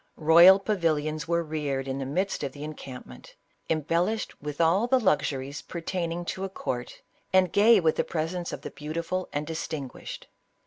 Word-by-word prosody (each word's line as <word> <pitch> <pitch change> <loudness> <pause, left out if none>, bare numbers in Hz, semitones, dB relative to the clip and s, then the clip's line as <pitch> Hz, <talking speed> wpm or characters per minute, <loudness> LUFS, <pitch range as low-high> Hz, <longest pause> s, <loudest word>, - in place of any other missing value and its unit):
Royal 170 +4 +8
pavilions 155 -7 -1
were 170 0 +1
reared 145 -4 -3
in 135 0 -3
the 135 - -3
midst 185 +8 -1
of 140 -3 -4
the 145 - -8
encampment, 145 -4 -9 0.3
embel 165 +2 +1
lished 220 0 -3
with 150 +1 -6
all 175 +8 +3
the 260 +1 +4
luxuries 145 - 0
pertaining 170 0 -4
to 190 - -4
a 195 - -2
court, 125 -9 -5 0.3
and 185 -2 +3
gay 215 +2 +6
with 160 -3 +1
the - - +2
presence 170 +2 -3
of - - -6
the - - -7
beautiful 170 +5 -4
and 145 +1 -2
distin 155 -3 -4
guished. - - -9
165 Hz, 175 wpm, -27 LUFS, 150-185 Hz, 0.3 s, Royal